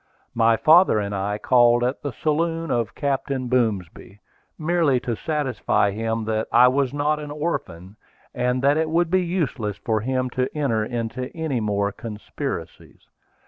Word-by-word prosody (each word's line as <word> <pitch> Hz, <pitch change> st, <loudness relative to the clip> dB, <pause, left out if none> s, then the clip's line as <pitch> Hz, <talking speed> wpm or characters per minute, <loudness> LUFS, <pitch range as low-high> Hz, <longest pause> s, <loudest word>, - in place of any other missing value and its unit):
My 115 Hz, -1 st, +3 dB
father 160 Hz, -, +5 dB
and 100 Hz, -1 st, -2 dB
I 100 Hz, +1 st, -2 dB
called 120 Hz, +2 st, +4 dB
at 125 Hz, +3 st, -1 dB
the 145 Hz, -, -4 dB
saloon 165 Hz, +3 st, -1 dB
of 120 Hz, -2 st, -1 dB
Captain 135 Hz, -2 st, -2 dB
Boomsby, 105 Hz, -5 st, -2 dB, 0.4 s
merely 160 Hz, -5 st, +2 dB
to 120 Hz, -2 st, -2 dB
satisfy 130 Hz, -, 0 dB
him 110 Hz, +1 st, -2 dB
that 110 Hz, 0 st, -1 dB
I 125 Hz, +2 st, +6 dB
was 135 Hz, 0 st, 0 dB
not 145 Hz, +1 st, 0 dB
an 150 Hz, -1 st, -7 dB
orphan, 105 Hz, -, -4 dB, 0.4 s
and 125 Hz, +1 st, -1 dB
that 140 Hz, +2 st, +4 dB
it 160 Hz, 0 st, 0 dB
would 170 Hz, +1 st, +1 dB
be 185 Hz, 0 st, +3 dB
useless 150 Hz, -, -2 dB
for 110 Hz, -2 st, -1 dB
him 130 Hz, +1 st, -1 dB
to 130 Hz, +1 st, -1 dB
enter 115 Hz, -7 st, +1 dB
into 120 Hz, +3 st, -4 dB
any 155 Hz, -6 st, -1 dB
more 100 Hz, -2 st, 0 dB
conspiracies. 105 Hz, +1 st, -7 dB
125 Hz, 155 wpm, -23 LUFS, 110-150 Hz, 0.4 s, I